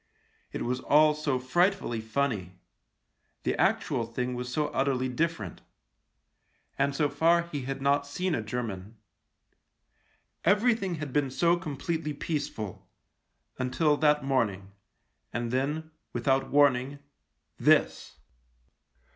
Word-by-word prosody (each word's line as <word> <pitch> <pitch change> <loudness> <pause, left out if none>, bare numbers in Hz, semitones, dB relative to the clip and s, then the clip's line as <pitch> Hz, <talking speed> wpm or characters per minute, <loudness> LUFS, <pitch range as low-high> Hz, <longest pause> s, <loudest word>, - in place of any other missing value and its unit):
It - - -4
was 125 +1 -1
all 150 +3 +5
so 150 -3 -1
frightfully 150 - +1
funny; 110 -6 -2 0.9
the - - 0
actual 115 - +1
thing 125 +2 -3
was 125 0 -5
so 150 +2 0
utterly 130 -1 0
different. 125 - -2 1.1
And 140 0 0
so 150 0 +2
far 165 +4 +3
he 145 -6 -5
had 135 0 -4
not 140 +1 +2
seen 180 +5 -2
a 120 - 0
German. 110 -3 -5 1.5
Everything 205 -3 +2
had 150 -4 -6
been 145 -2 +1
so 170 +6 +3
completely 160 -1 -3
peaceful 115 - -4 0.3
— - - -47
until 140 +4 +2
that 150 -1 +3
morning 105 -8 0 0.3
— - - -45
and 120 -1 -2
then, 150 +5 -1 0.2
without 135 +3 +1
warning 140 -1 +3 0.3
— - - -44
this. - - +2
140 Hz, 120 wpm, -28 LUFS, 125-155 Hz, 1.5 s, all